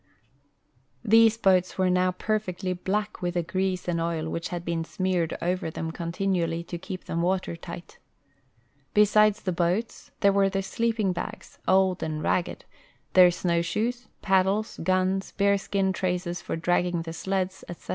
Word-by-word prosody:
These 225 Hz, +1 st, +6 dB
boats 185 Hz, -4 st, +3 dB
Avere 185 Hz, -1 st, +2 dB
noAV 180 Hz, 0 st, +1 dB
perfectly 190 Hz, -4 st, -2 dB
black 205 Hz, +4 st, -2 dB
Avith 175 Hz, -1 st, -3 dB
the 175 Hz, -1 st, 0 dB
grease 185 Hz, +1 st, -2 dB
and 170 Hz, -1 st, 0 dB
oil 165 Hz, -1 st, -2 dB
which 165 Hz, +1 st, -4 dB
had 175 Hz, -1 st, -5 dB
been 165 Hz, -1 st, -1 dB
smeared 180 Hz, -1 st, -1 dB
over 180 Hz, -1 st, -1 dB
them 160 Hz, 0 st, -4 dB
continually 170 Hz, 0 st, -1 dB
to 170 Hz, 0 st, -6 dB
keep 185 Hz, 0 st, -7 dB
them 170 Hz, -, -2 dB
Avater 180 Hz, 0 st, 0 dB
tight. 170 Hz, +1 st, -10 dB, 1.0 s
Besides 210 Hz, +1 st, +5 dB
the 185 Hz, -, 0 dB
boats, 180 Hz, +6 st, -1 dB
there 200 Hz, -1 st, +5 dB
Avere 195 Hz, -1 st, +3 dB
the 195 Hz, 0 st, -1 dB
sleeping 220 Hz, -2 st, 0 dB
bags, 175 Hz, -, -7 dB
old 190 Hz, -1 st, +3 dB
and 155 Hz, -1 st, -3 dB
ragged, 180 Hz, -, -1 dB, 0.5 s
their 180 Hz, -1 st, +8 dB
snoAvshoes, 180 Hz, +8 st, -1 dB, 0.2 s
paddles, 195 Hz, +2 st, +1 dB
guns, 185 Hz, +1 st, 0 dB
bear 200 Hz, 0 st, +3 dB
skin 195 Hz, -1 st, 0 dB
traces 180 Hz, -1 st, -2 dB
for -, -, -4 dB
dragging 175 Hz, 0 st, 0 dB
the 165 Hz, 0 st, -6 dB
sleds, 190 Hz, +2 st, -2 dB
etc. 175 Hz, -, -10 dB
185 Hz, 155 wpm, -26 LUFS, 175-195 Hz, 1.0 s, their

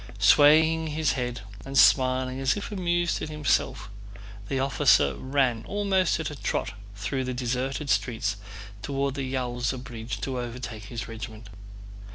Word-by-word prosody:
Swaying 155 Hz, +10 st, +5 dB
his 155 Hz, -1 st, 0 dB
head 125 Hz, -3 st, -3 dB, 0.2 s
and 135 Hz, 0 st, -4 dB
smiling 130 Hz, 0 st, +4 dB
as 135 Hz, +4 st, +1 dB
if 205 Hz, -, -5 dB
amused 175 Hz, -3 st, 0 dB
at -, -, -4 dB
himself, 150 Hz, -9 st, 0 dB, 0.6 s
the 135 Hz, -, -1 dB
officer 130 Hz, -, +3 dB
ran 130 Hz, -, 0 dB
almost 195 Hz, -4 st, +1 dB
at 160 Hz, -, -3 dB
a -, -, -7 dB
trot 110 Hz, -5 st, -2 dB, 0.2 s
through 130 Hz, +6 st, -2 dB
the 130 Hz, -1 st, -3 dB
deserted 130 Hz, +4 st, -2 dB
streets 115 Hz, -6 st, 0 dB, 0.4 s
toward 140 Hz, +2 st, -1 dB
the 135 Hz, -2 st, -4 dB
Yaúza 125 Hz, -1 st, -2 dB
bridge 115 Hz, -1 st, -6 dB
to 130 Hz, -2 st, -3 dB
overtake 120 Hz, -3 st, -6 dB
his 115 Hz, +2 st, -6 dB
regiment. 110 Hz, -1 st, -8 dB
130 Hz, 145 wpm, -26 LUFS, 120-145 Hz, 0.6 s, Swaying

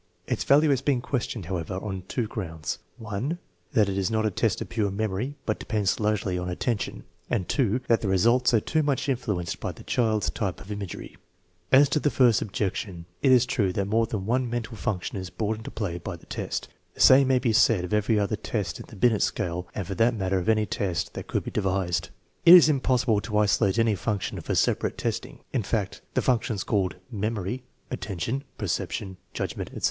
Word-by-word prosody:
Its -, -, -1 dB
value 150 Hz, +2 st, +5 dB
has 135 Hz, -2 st, +2 dB
been 135 Hz, -2 st, +1 dB
questioned, 120 Hz, -5 st, -3 dB
however, 90 Hz, 0 st, -3 dB
on 95 Hz, 0 st, -4 dB
two 120 Hz, +3 st, -1 dB
grounds: 80 Hz, -, -4 dB, 0.2 s
(1) 115 Hz, +9 st, -3 dB, 0.4 s
That 105 Hz, -3 st, +4 dB
it 100 Hz, 0 st, -1 dB
is 95 Hz, -, 0 dB
not 110 Hz, 0 st, +1 dB
a 110 Hz, -, +1 dB
test 110 Hz, +4 st, 0 dB
of -, -, -4 dB
pure 110 Hz, -4 st, 0 dB
memory, 110 Hz, +6 st, -2 dB
but 110 Hz, -, -1 dB
depends 105 Hz, -3 st, 0 dB
largely 105 Hz, -4 st, 0 dB
on 90 Hz, 0 st, -3 dB
attention; 105 Hz, +4 st, -2 dB, 0.3 s
and 90 Hz, -, 0 dB
(2) 125 Hz, -2 st, +1 dB
that 115 Hz, -, +3 dB
the 105 Hz, -, -2 dB
results 115 Hz, +7 st, +3 dB
are 115 Hz, -, +4 dB
too 155 Hz, +8 st, 0 dB
much 145 Hz, -2 st, 0 dB
influenced 105 Hz, -10 st, -2 dB
by -, -, -3 dB
the -, -, -13 dB
child's 110 Hz, -3 st, +1 dB
type 100 Hz, -6 st, -3 dB
of 100 Hz, -, -10 dB
imagery. 100 Hz, -3 st, -6 dB, 0.5 s
As 140 Hz, +2 st, +7 dB
to 145 Hz, -, +2 dB
the 145 Hz, -, +2 dB
first 125 Hz, -6 st, +4 dB
objection, 95 Hz, -3 st, -3 dB, 0.2 s
it 135 Hz, -, +4 dB
is 125 Hz, -1 st, +6 dB
true 120 Hz, -7 st, +1 dB
that 100 Hz, -, 0 dB
more 110 Hz, +3 st, +2 dB
than 105 Hz, -4 st, -3 dB
one 125 Hz, +2 st, +1 dB
mental 115 Hz, -1 st, -3 dB
function 100 Hz, -2 st, -3 dB
is 95 Hz, -1 st, -6 dB
brought 110 Hz, +2 st, -2 dB
into 110 Hz, -, -7 dB
play 90 Hz, -6 st, -3 dB
by 85 Hz, -, -5 dB
the 85 Hz, -, -16 dB
test. -, -, -4 dB, 0.3 s
The -, -, -17 dB
same 130 Hz, +1 st, +8 dB
may 130 Hz, -1 st, +4 dB
be 125 Hz, -3 st, +1 dB
said 105 Hz, -3 st, +4 dB
of 90 Hz, -, -4 dB
every 105 Hz, +1 st, +2 dB
other 105 Hz, +1 st, 0 dB
test 100 Hz, -, -3 dB
in -, -, -9 dB
the -, -, -12 dB
Binet 110 Hz, +1 st, +3 dB
scale 90 Hz, -3 st, -1 dB
and 100 Hz, -, -3 dB
for 95 Hz, -, -4 dB
that 115 Hz, +3 st, +3 dB
matter 95 Hz, -2 st, 0 dB
of 90 Hz, -, -2 dB
any 110 Hz, -1 st, +3 dB
test 95 Hz, -2 st, -2 dB
that -, -, -7 dB
could -, -, -1 dB
be -, -, -6 dB
devised. 90 Hz, -3 st, 0 dB, 0.3 s
It 170 Hz, -, +11 dB
is 170 Hz, -3 st, +8 dB
impossible 130 Hz, -6 st, +2 dB
to 105 Hz, -1 st, -2 dB
isolate 105 Hz, -1 st, +3 dB
any 115 Hz, -1 st, +3 dB
function 100 Hz, +1 st, -2 dB
for -, -, -2 dB
separate -, -, +1 dB
testing. -, -, -3 dB
In -, -, +1 dB
fact, -, -, -2 dB
the -, -, +2 dB
functions 115 Hz, -5 st, +1 dB
called 100 Hz, -4 st, 0 dB, 0.2 s
memory, 110 Hz, +2 st, -2 dB, 0.3 s
attention, 115 Hz, +2 st, -3 dB
perception, 95 Hz, -2 st, -3 dB, 0.2 s
judgment, -, -, -3 dB
etc. -, -, -8 dB
105 Hz, 210 wpm, -26 LUFS, 95-120 Hz, 0.5 s, It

